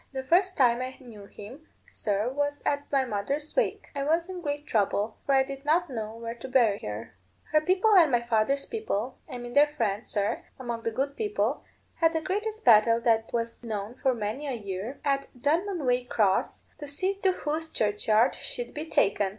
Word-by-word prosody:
The 265 Hz, 0 st, -3 dB
first 365 Hz, +6 st, +2 dB
time 245 Hz, -2 st, +4 dB
I 255 Hz, +1 st, -5 dB
knew 220 Hz, -6 st, -12 dB
him, 250 Hz, +11 st, -12 dB, 0.2 s
sir, 205 Hz, +1 st, -1 dB
was 290 Hz, +2 st, -2 dB
at 285 Hz, 0 st, -1 dB
my 270 Hz, -2 st, +2 dB
mother's 260 Hz, +7 st, -3 dB
wake. -, -, 0 dB
I 280 Hz, -, -1 dB
was 330 Hz, +4 st, +1 dB
in 365 Hz, -1 st, -6 dB
great 290 Hz, -2 st, -3 dB
trouble, 210 Hz, -1 st, 0 dB
for 275 Hz, -, +4 dB
I 265 Hz, -, +5 dB
did 275 Hz, 0 st, -8 dB
not 330 Hz, +2 st, +2 dB
know 220 Hz, -2 st, -4 dB
where 230 Hz, 0 st, -5 dB
to 235 Hz, +2 st, -9 dB
bury 235 Hz, -6 st, +3 dB
her. 105 Hz, +2 st, -6 dB, 0.4 s
Her 305 Hz, 0 st, +4 dB
people 370 Hz, +6 st, +3 dB
and 340 Hz, -5 st, +7 dB
my 240 Hz, -1 st, +2 dB
father's 235 Hz, +4 st, +1 dB
people 270 Hz, -, -3 dB
I 250 Hz, -, -4 dB
mean 240 Hz, 0 st, -7 dB
their 290 Hz, +2 st, +6 dB
friends, 220 Hz, -8 st, -2 dB
sir, 205 Hz, -1 st, 0 dB, 0.2 s
among 240 Hz, -3 st, -4 dB
the 230 Hz, -, -1 dB
good 270 Hz, +5 st, -2 dB
people 420 Hz, +2 st, -1 dB, 0.3 s
had 325 Hz, 0 st, +3 dB
the 320 Hz, -, 0 dB
greatest 425 Hz, +6 st, -3 dB
battle 230 Hz, 0 st, +6 dB
that 225 Hz, -2 st, +2 dB
was 230 Hz, 0 st, -3 dB
known 215 Hz, -1 st, -4 dB
for 260 Hz, -2 st, +2 dB
many 225 Hz, +7 st, -3 dB
a 270 Hz, -, -2 dB
year, 205 Hz, +3 st, -5 dB
at 275 Hz, -1 st, +1 dB
Dunmanwaycross, 255 Hz, -, +1 dB, 0.2 s
to 295 Hz, -, -7 dB
see 370 Hz, +8 st, -2 dB
to 380 Hz, -1 st, +3 dB
whose 320 Hz, -1 st, -3 dB
churchyard 215 Hz, +1 st, +2 dB
she'd -, -, -4 dB
be 305 Hz, +2 st, -5 dB
taken. 200 Hz, -7 st, +2 dB
265 Hz, 190 wpm, -28 LUFS, 225-305 Hz, 0.4 s, and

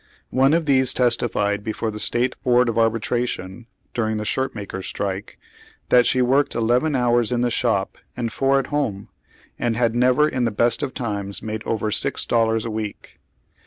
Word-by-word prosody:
One 135 Hz, +4 st, +4 dB
of 165 Hz, -1 st, 0 dB
these 130 Hz, -3 st, +3 dB
testified 105 Hz, -4 st, 0 dB
before 110 Hz, 0 st, -3 dB
the 105 Hz, -, -6 dB
State 125 Hz, +3 st, +1 dB
Board 125 Hz, -1 st, +3 dB
of 115 Hz, -, -3 dB
Arbitration, 115 Hz, -2 st, -1 dB, 0.3 s
during 110 Hz, -2 st, -1 dB
the 105 Hz, -, -4 dB
shirt 130 Hz, +4 st, -1 dB
makers' 100 Hz, -3 st, -6 dB
strike, 100 Hz, 0 st, -4 dB, 0.5 s
that 125 Hz, -1 st, +5 dB
she 130 Hz, -1 st, +3 dB
worked 135 Hz, +3 st, +2 dB
eleven 125 Hz, +6 st, +1 dB
hours 120 Hz, -2 st, +2 dB
in 120 Hz, -1 st, 0 dB
tlie 120 Hz, -1 st, +1 dB
shop 110 Hz, -5 st, 0 dB, 0.2 s
and 115 Hz, -2 st, -3 dB
four 135 Hz, 0 st, +2 dB
at 135 Hz, -, -1 dB
home, 110 Hz, -10 st, -2 dB, 0.5 s
and 120 Hz, -2 st, 0 dB
had 115 Hz, -2 st, +2 dB
never 125 Hz, +5 st, +3 dB
in 130 Hz, -4 st, -1 dB
the 115 Hz, -, +2 dB
best 115 Hz, +2 st, +1 dB
of 130 Hz, -, -4 dB
times 100 Hz, -4 st, -3 dB
made 110 Hz, 0 st, -4 dB
over 110 Hz, -1 st, -1 dB
six -, -, -1 dB
dollars 115 Hz, -1 st, +1 dB
a 115 Hz, -, -3 dB
week. 110 Hz, -1 st, -6 dB
120 Hz, 180 wpm, -22 LUFS, 110-125 Hz, 0.5 s, that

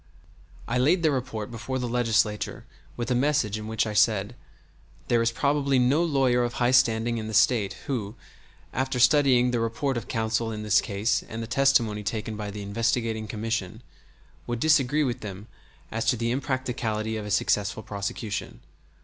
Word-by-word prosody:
I 125 Hz, +2 st, 0 dB
laid 165 Hz, +7 st, +3 dB
their 155 Hz, -, +4 dB
report 125 Hz, -5 st, -3 dB
before 120 Hz, +3 st, -4 dB
the 125 Hz, -1 st, -2 dB
Legislature 115 Hz, -3 st, 0 dB, 0.3 s
with 120 Hz, +1 st, -3 dB
a -, -, +4 dB
message 125 Hz, -5 st, +1 dB
in 105 Hz, -, -7 dB
which 110 Hz, 0 st, 0 dB
I 105 Hz, -, -3 dB
said: 105 Hz, 0 st, +2 dB, 0.8 s
"There 120 Hz, -1 st, +3 dB
is 115 Hz, 0 st, +2 dB
probably 140 Hz, +1 st, +1 dB
no 130 Hz, +6 st, +3 dB
lawyer 135 Hz, -6 st, +2 dB
of 120 Hz, 0 st, -2 dB
high 120 Hz, -1 st, +1 dB
standing 115 Hz, -2 st, +3 dB
in 110 Hz, -, -5 dB
the 110 Hz, -, -4 dB
State 110 Hz, -2 st, +3 dB
who, 115 Hz, -5 st, -3 dB, 0.6 s
after 130 Hz, 0 st, -1 dB
studying 125 Hz, -2 st, +4 dB
the 120 Hz, -, 0 dB
report 115 Hz, +4 st, -1 dB
of 115 Hz, -, -5 dB
counsel 115 Hz, 0 st, -1 dB
in 105 Hz, -1 st, -5 dB
this 105 Hz, +1 st, +4 dB
case 105 Hz, +3 st, 0 dB
and 115 Hz, +1 st, -5 dB
the -, -, -4 dB
testimony 115 Hz, -3 st, +2 dB
taken 110 Hz, +1 st, -3 dB
by 105 Hz, -1 st, -5 dB
the 100 Hz, 0 st, -6 dB
investigating 115 Hz, +1 st, -1 dB
commission, 110 Hz, 0 st, -3 dB, 0.6 s
would 120 Hz, -1 st, -2 dB
disagree 150 Hz, 0 st, +3 dB
with 125 Hz, -5 st, -2 dB
them 100 Hz, -1 st, -8 dB, 0.5 s
as 115 Hz, +1 st, -2 dB
to 125 Hz, -, +2 dB
the 115 Hz, +1 st, -1 dB
impracticability 120 Hz, -4 st, -2 dB
of 105 Hz, -1 st, -5 dB
a -, -, -5 dB
successful 105 Hz, +1 st, 0 dB
prosecution. 100 Hz, +1 st, -5 dB
115 Hz, 175 wpm, -26 LUFS, 110-130 Hz, 0.8 s, their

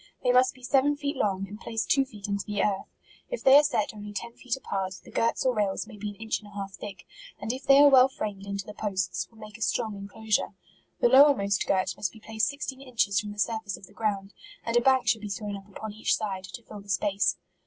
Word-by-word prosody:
They 250 Hz, -, +4 dB
must 255 Hz, +1 st, +4 dB
be 255 Hz, -, -18 dB
seven 275 Hz, +3 st, +3 dB
feet 285 Hz, 0 st, -3 dB
long, 195 Hz, -1 st, 0 dB
and 205 Hz, +2 st, -9 dB
placed 225 Hz, -1 st, -2 dB
two 275 Hz, -1 st, +4 dB
feet 210 Hz, -6 st, -9 dB
into 200 Hz, -1 st, -1 dB
the 205 Hz, -1 st, 0 dB
earth. 195 Hz, -2 st, 0 dB, 0.4 s
If -, -, -4 dB
they 265 Hz, 0 st, +8 dB
are 290 Hz, -, +10 dB
set 220 Hz, -9 st, 0 dB
only 210 Hz, -1 st, -8 dB
ten 235 Hz, +3 st, -5 dB
fe 255 Hz, -, -18 dB
t -, -, +2 dB
apart, 190 Hz, -7 st, -3 dB
the -, -, -14 dB
girts 230 Hz, +3 st, +1 dB
or 255 Hz, -, +3 dB
rails 205 Hz, -3 st, 0 dB
may -, -, -12 dB
be 210 Hz, 0 st, -5 dB
an 205 Hz, -, -9 dB
inch 220 Hz, +2 st, -2 dB
and 210 Hz, -, -15 dB
a 205 Hz, -, -15 dB
half 195 Hz, -1 st, -5 dB
thick, 195 Hz, 0 st, -9 dB, 0.3 s
and 225 Hz, -, -2 dB
if 260 Hz, +2 st, -7 dB
they 275 Hz, -, +7 dB
are 290 Hz, -, +9 dB
well 260 Hz, -1 st, +7 dB
framed 205 Hz, -6 st, -5 dB
into 200 Hz, -1 st, -3 dB
the 210 Hz, -, -8 dB
posts, 195 Hz, -3 st, -2 dB
will 225 Hz, -, -22 dB
make 215 Hz, 0 st, -11 dB
a -, -, -17 dB
strong 220 Hz, -1 st, 0 dB
inclosure. 205 Hz, +1 st, -2 dB, 0.5 s
The -, -, +6 dB
lowermost 250 Hz, -7 st, +5 dB
girt 190 Hz, -1 st, +1 dB
must 200 Hz, -, -1 dB
be 220 Hz, -, -13 dB
placed 220 Hz, +1 st, -1 dB
sixteen 280 Hz, -2 st, -5 dB
inches 230 Hz, -7 st, +1 dB
from 210 Hz, -1 st, -5 dB
the 205 Hz, -, -10 dB
surface 220 Hz, -1 st, -1 dB
of -, -, -13 dB
the -, -, -20 dB
ground, 200 Hz, -2 st, -2 dB, 0.3 s
and 230 Hz, -, -1 dB
a 240 Hz, -, +6 dB
bank 260 Hz, 0 st, +3 dB
should 220 Hz, -, +3 dB
be 210 Hz, -, -5 dB
thrown 205 Hz, +1 st, -4 dB
up 195 Hz, +1 st, -11 dB
upon 215 Hz, +1 st, -7 dB
each 220 Hz, -, +1 dB
side, 195 Hz, -4 st, -4 dB
to 235 Hz, +5 st, -9 dB
fill 210 Hz, -2 st, -10 dB
the 200 Hz, -, -17 dB
space. 195 Hz, +1 st, +1 dB
215 Hz, 260 wpm, -28 LUFS, 200-245 Hz, 0.5 s, are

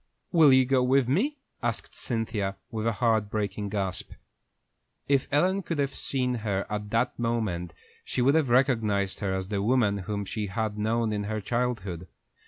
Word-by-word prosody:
"Will 160 Hz, -5 st, +7 dB
you 130 Hz, 0 st, +6 dB
go 130 Hz, 0 st, +3 dB
with 130 Hz, 0 st, +3 dB
me?" 235 Hz, -, +1 dB, 0.2 s
asked 120 Hz, -4 st, -3 dB
Cynthia, 110 Hz, -4 st, -2 dB, 0.2 s
with 110 Hz, -1 st, -2 dB
a 115 Hz, -, +2 dB
heart 110 Hz, -1 st, +1 dB
breaking 105 Hz, -1 st, -2 dB
gasp. 95 Hz, -3 st, -3 dB, 0.9 s
If 140 Hz, -2 st, +2 dB
Ellen 185 Hz, +7 st, +2 dB
could 165 Hz, -3 st, -4 dB
have 140 Hz, -1 st, 0 dB
seen 125 Hz, -2 st, 0 dB
her 100 Hz, -3 st, -1 dB
at 105 Hz, 0 st, -3 dB
that 115 Hz, +4 st, 0 dB
moment, 105 Hz, -8 st, -1 dB, 0.3 s
she -, -, -3 dB
would 130 Hz, +3 st, +4 dB
have 155 Hz, -5 st, +2 dB
recognized 115 Hz, -7 st, +2 dB
her 100 Hz, -3 st, -1 dB
as 95 Hz, 0 st, -4 dB
the 100 Hz, -2 st, -1 dB
woman 110 Hz, -3 st, +2 dB
whom 100 Hz, +1 st, -3 dB
she 105 Hz, +1 st, -3 dB
had 105 Hz, +2 st, -2 dB
known 110 Hz, +1 st, 0 dB
in 105 Hz, -1 st, -2 dB
her 110 Hz, +1 st, -2 dB
childhood. 105 Hz, -7 st, -2 dB
110 Hz, 175 wpm, -27 LUFS, 100-130 Hz, 0.9 s, Will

